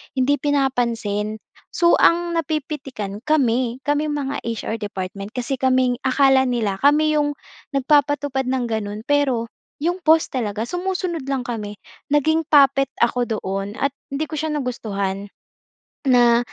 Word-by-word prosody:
hindi 265 Hz, +2 st, +3 dB
pinapansin. 235 Hz, -7 st, 0 dB, 0.4 s
So, 345 Hz, 0 st, +5 dB
ang 340 Hz, 0 st, +3 dB
napipitikan 270 Hz, -10 st, -4 dB
kami, 255 Hz, -4 st, +1 dB
kaming 295 Hz, +1 st, +1 dB
mga 280 Hz, -1 st, -3 dB
HR 230 Hz, -1 st, -3 dB
department, 200 Hz, 0 st, -5 dB
kasi 250 Hz, +2 st, -2 dB
kaming 255 Hz, -2 st, +2 dB
akala 270 Hz, 0 st, +4 dB
nila 220 Hz, -6 st, -1 dB
kami 305 Hz, +2 st, +4 dB
'yong 290 Hz, 0 st, 0 dB, 0.4 s
nagpapatupad 285 Hz, -1 st, +2 dB
nang 260 Hz, -1 st, 0 dB
gano'n, 215 Hz, -1 st, -3 dB
pero 270 Hz, -5 st, +1 dB, 0.4 s
'yong 350 Hz, +2 st, 0 dB
boss 320 Hz, 0 st, +5 dB
talaga, 220 Hz, -4 st, -2 dB
sumusunod 355 Hz, -1 st, -3 dB
lang 270 Hz, -2 st, -1 dB
kami. 210 Hz, -4 st, -5 dB, 0.4 s
Naging 315 Hz, +3 st, +3 dB
puppet 275 Hz, -2 st, +5 dB
ako 240 Hz, +1 st, +2 dB
doon 195 Hz, -1 st, -3 dB
at 280 Hz, -, 0 dB, 0.2 s
hindi 280 Hz, +3 st, -2 dB
ko 310 Hz, -, -6 dB
siya 315 Hz, 0 st, -2 dB
nagustuhan, 200 Hz, -7 st, -3 dB, 0.8 s
na, 240 Hz, -2 st, +5 dB
260 Hz, 130 wpm, -21 LUFS, 225-290 Hz, 0.8 s, So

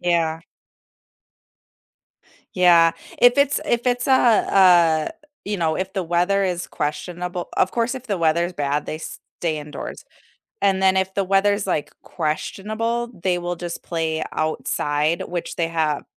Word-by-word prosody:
Yeah. 165 Hz, -2 st, +1 dB, 2.1 s
Yeah. 170 Hz, -2 st, +5 dB, 0.3 s
If 245 Hz, +2 st, +6 dB
it's 280 Hz, 0 st, +3 dB
if 240 Hz, +1 st, 0 dB
it's 245 Hz, 0 st, +1 dB
a 270 Hz, -, +3 dB
a 180 Hz, -9 st, +4 dB, 0.3 s
you 205 Hz, 0 st, -2 dB
know, 160 Hz, -3 st, 0 dB
if 190 Hz, 0 st, -3 dB
the 190 Hz, -1 st, -2 dB
weather 180 Hz, +4 st, +1 dB
is 180 Hz, -2 st, -2 dB
questionable 175 Hz, +4 st, -4 dB
of 185 Hz, -, +2 dB
course 235 Hz, +2 st, -1 dB
if 260 Hz, -1 st, -8 dB
the 200 Hz, -5 st, -2 dB
weather's 170 Hz, +2 st, +1 dB
bad, 145 Hz, -3 st, -2 dB
they 155 Hz, -, -4 dB
stay 160 Hz, 0 st, -5 dB
indoors, 150 Hz, 0 st, -8 dB, 0.6 s
and 190 Hz, -1 st, +2 dB
then 190 Hz, 0 st, +4 dB
if 190 Hz, 0 st, 0 dB
the 200 Hz, -, 0 dB
weather's, 200 Hz, +2 st, +2 dB
like, 155 Hz, -6 st, -1 dB
questionable, 215 Hz, +9 st, -3 dB
they 180 Hz, -1 st, +1 dB
will 175 Hz, 0 st, -3 dB
just 170 Hz, 0 st, -6 dB
play 160 Hz, -2 st, -2 dB
outside, 155 Hz, 0 st, -1 dB
which 175 Hz, -1 st, -4 dB
they 165 Hz, -1 st, 0 dB
have 160 Hz, -3 st, -1 dB
175 Hz, 145 wpm, -22 LUFS, 160-200 Hz, 2.1 s, If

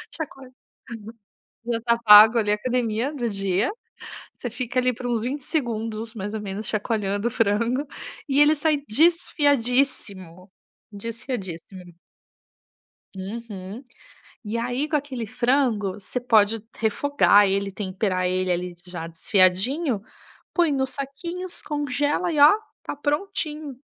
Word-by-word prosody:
chacoalha 270 Hz, -5 st, -7 dB, 1.2 s
já 235 Hz, -1 st, -1 dB
tá 235 Hz, 0 st, +2 dB
pago 215 Hz, +1 st, +9 dB
ali 210 Hz, -2 st, +1 dB
a -, -, +4 dB
academia 240 Hz, +3 st, -1 dB
do 240 Hz, -5 st, -2 dB
dia, 195 Hz, +2 st, 0 dB, 0.7 s
você 245 Hz, -, -4 dB
fica 250 Hz, +1 st, -2 dB
ali 250 Hz, 0 st, +2 dB
por 245 Hz, -, -9 dB
uns 235 Hz, -2 st, 0 dB
20 265 Hz, +3 st, -3 dB
segundos, 225 Hz, -6 st, -3 dB
mais 205 Hz, 0 st, -5 dB
ou 220 Hz, -, -3 dB
menos, 205 Hz, +1 st, -5 dB
chacoalhando 210 Hz, -1 st, -1 dB
o 240 Hz, -, -2 dB
frango, 230 Hz, +6 st, +1 dB, 0.4 s
e 275 Hz, 0 st, +2 dB
ele 300 Hz, +1 st, +6 dB
sai 310 Hz, 0 st, +1 dB
desfiadíssimo. 250 Hz, -, +1 dB, 0.4 s
Desfiadíssimo. 200 Hz, -5 st, -6 dB, 1.2 s
Uhum. 200 Hz, +2 st, -7 dB, 0.6 s
E 210 Hz, +2 st, -5 dB
aí 245 Hz, +5 st, -1 dB
com 305 Hz, -, -1 dB
aquele 270 Hz, -5 st, -3 dB
frango, 240 Hz, -4 st, +1 dB
você 205 Hz, +5 st, -5 dB
pode 225 Hz, -3 st, +3 dB
refogar 220 Hz, -2 st, +4 dB
ele, 195 Hz, 0 st, 0 dB
temperar 185 Hz, -1 st, -1 dB
ele 185 Hz, 0 st, 0 dB
ali, 180 Hz, 0 st, -2 dB
já 175 Hz, -2 st, -6 dB
desfiadinho, 195 Hz, -, +1 dB, 0.5 s
põe 340 Hz, -4 st, +3 dB
nos 265 Hz, -1 st, -1 dB
saquinhos, 340 Hz, +7 st, -6 dB
congela 290 Hz, +4 st, -1 dB
e 300 Hz, -, -1 dB
ó: 290 Hz, +1 st, +9 dB, 0.3 s
tá -, -, -5 dB
prontinho! 300 Hz, -1 st, -3 dB
230 Hz, 125 wpm, -24 LUFS, 200-275 Hz, 1.2 s, pago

